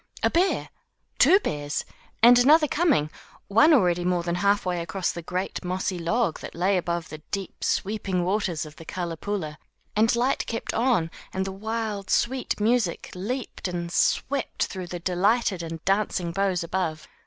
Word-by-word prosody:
A - - +3
bear! 365 +3 +1 0.5
two 385 - +7
bears! 145 - -3 0.4
and 245 +1 +9
another 300 +5 +6
coming; 280 - +2 0.4
one 230 +11 +6
already 180 - +3
more 180 -1 +1
than 170 0 -1
half 200 +3 +2
way 180 -2 -1
across 185 +2 -2
the 170 - -6
great, 180 +3 -4
mossy 185 0 -2
log 170 +2 0
that - - -9
lay 185 +4 +2
above 170 -2 -2
the 155 - -8
deep, 195 -2 -5
sweeping 195 -3 -1
waters 185 -4 -1
of 155 0 -12
the - - -10
CaKpoola; 170 -1 -4 0.4
and 225 +2 +3
Lyte 250 +3 0
kept 230 - -3
on, 225 -9 +1 0.2
and 190 0 -2
the 195 - -3
wild, 215 0 -4
sweet 255 -1 0
music 220 -4 +1
leaped 220 +5 -4
up 180 - -4
and 170 -1 -4
swept 275 +9 0
through 185 -3 -6
the 175 - -5
delighted 190 +2 +1
and 165 -1 -7
dancing 195 -3 0
boughs 190 -1 0
above. 165 -3 -3
190 Hz, 165 wpm, -25 LUFS, 170-225 Hz, 0.5 s, and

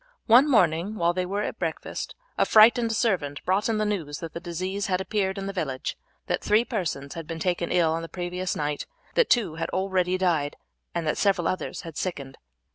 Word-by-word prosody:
One 255 +6 +6
morning 185 - +3
when 170 -3 +2
they 180 0 -1
were 200 +2 -1
at - - -4
breakfast - - -4 0.2
a - - +3
frightened 230 +1 +6
servant 180 -11 0
brought 195 +5 +1
in 225 - +1
the 215 - +1
news 165 -9 -2
that 165 +1 -7
the - - -4
disease 185 +3 -3
had 185 -1 +1
appeared 190 0 -1
in 195 - -4
the 195 - -4
village, 135 -9 -3 0.3
that - - -1
three 215 +3 +3
persons 155 - -3
had 165 -2 -7
been 165 0 -4
taken 175 0 -1
ill 170 -3 +3
on 165 - -2
the 165 - -7
previous 180 0 -3
night, 150 -1 -2 0.3
that - - +3
two 195 -10 +2
had 165 - -2
already 185 -1 0
died, 165 -6 +1 0.4
and 170 - -1
that 150 - 0
several 195 -4 +2
others 185 - -3
had 165 -3 -9
sickened. 140 -7 -4
180 Hz, 205 wpm, -26 LUFS, 165-200 Hz, 0.4 s, One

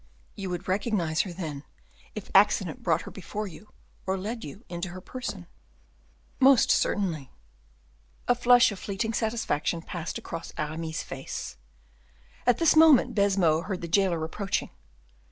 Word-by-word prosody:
"You 195 -2 -5
would 175 -1 -5
recognize 185 -5 0
her, 190 - -5
then, 155 -5 -6 0.5
if 215 - -7
accident 195 -4 +3
brought 165 -1 +1
her - - -9
before 205 +3 -5
you, 195 +3 -11 0.4
or 190 0 0
led 225 +5 -5
you 210 +5 -10
into 175 +1 -4
her 180 +1 -8
person?" 205 -3 -6 0.9
"Most 265 -1 +6
certainly." 170 - 0 1.0
A 245 - +5
flush 245 -1 +5
of 200 - -7
fleeting 205 +4 -3
satisfaction 220 -8 -1
passed 170 -1 -5
across 165 - -7
Aramis's 160 +1 -3
face. 135 0 -6 0.9
At 245 -2 +5
this 330 -2 +4
moment 305 -6 +6
Baisemeaux 195 -6 +3
heard 185 0 -4
the 170 - -4
jailer 170 -2 +2
approaching. 195 +4 -3
190 Hz, 140 wpm, -27 LUFS, 165-220 Hz, 1.0 s, Most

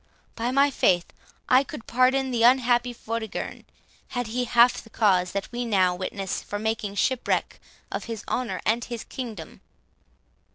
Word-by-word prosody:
By 235 +1 -1
my 275 +2 +3
faith, 175 -8 +2 0.3
I 255 +2 +5
could 230 - -9
pardon 260 +2 +2
the 235 -2 0
unhappy 245 0 +4
Vortigern, 230 -2 -5 0.4
had 245 -1 -3
he 245 +3 -2
half 240 +1 +4
the 225 - -16
cause 185 -5 +2
that 200 -1 -3
we 245 0 -3
now 190 -6 +2
witness, 190 +1 -4
for 205 - -5
making 215 -1 -2
shipwreck 255 +4 0 0.3
of - - -4
his 225 -3 -6
honour 250 -2 -2
and 230 +2 +2
his 235 -3 -6
kingdom." 220 -11 -8
230 Hz, 155 wpm, -25 LUFS, 205-250 Hz, 0.4 s, I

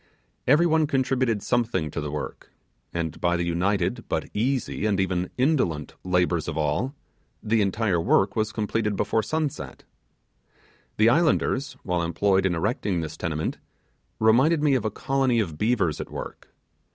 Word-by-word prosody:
Every 150 +7 +5
one 160 -2 +3
contributed 130 -6 0
something 110 -11 0
to - - -3
the 75 - -4
work; 75 0 -6 0.4
and 85 -2 -4
by 85 0 +2
the 85 - -1
united, 95 +6 0
but - - -2
easy, 120 -1 -1
and 100 -2 +1
even 90 -1 0
indolent, 125 - +1
labours 90 -2 +1
of 80 -2 -3
all, 80 - -1 0.5
the 110 0 +2
entire 100 -3 +1
work 95 +3 +2
was 110 -1 0
completed 110 -1 -1
before 110 - +1
sunset. 150 +6 -3 1.1
The 110 +2 +5
islanders, 145 -1 +1
while 90 -2 0
employed 95 +3 +2
in 90 - -1
erecting 100 -1 -1
this 80 -1 -5
tenement, 80 -2 -3 0.6
reminded 135 +9 +4
me 145 -2 +4
of 125 -5 +1
a - - +2
colony 130 +2 +1
of 80 -8 -3
beavers 105 -9 +1
at - - -7
work. - - -8
105 Hz, 150 wpm, -25 LUFS, 85-125 Hz, 1.1 s, Every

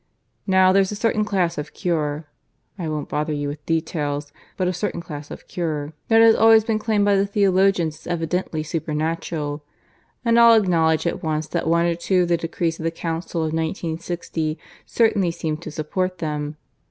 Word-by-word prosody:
Now 190 -1 +5
there's 195 0 +3
a - - -3
certain 215 0 +1
class 185 -6 0
of 150 - -7
cure 155 -4 -1 0.5
(I 165 -3 -3
won't 150 -1 -3
bother 150 +1 -2
you 145 -1 -2
with 145 +1 -6
details, 145 -3 -2 0.2
but 185 - 0
a 180 - 0
certain 180 0 -3
class 150 -4 -8
of - - -10
cure) 155 -3 -3
that 225 0 +6
has 225 0 +8
always 225 0 +6
been 220 -1 0
claimed 210 -2 +1
by 200 -1 +3
theologians 195 -5 +2
as - - -14
evidently 165 -1 -2
supernatural. 155 -1 -3 0.6
And 230 0 +4
I'll 230 -1 +8
acknowledge 165 -5 +2
at 170 - -1
once 155 -1 -1
that 170 -2 -2
one 170 +1 +3
or 170 - +2
two 180 +2 +1
of 175 - -2
the 170 - +3
decrees 165 0 -2
of - - -5
the 165 - +1
Council 165 0 -4
of 160 -1 -1
1960 165 -1 -3 0.3
certainly 215 -6 +2
seem 160 -2 -3
to 160 0 -8
support 185 +5 -2
them. 150 -2 -4
170 Hz, 180 wpm, -22 LUFS, 155-190 Hz, 0.6 s, has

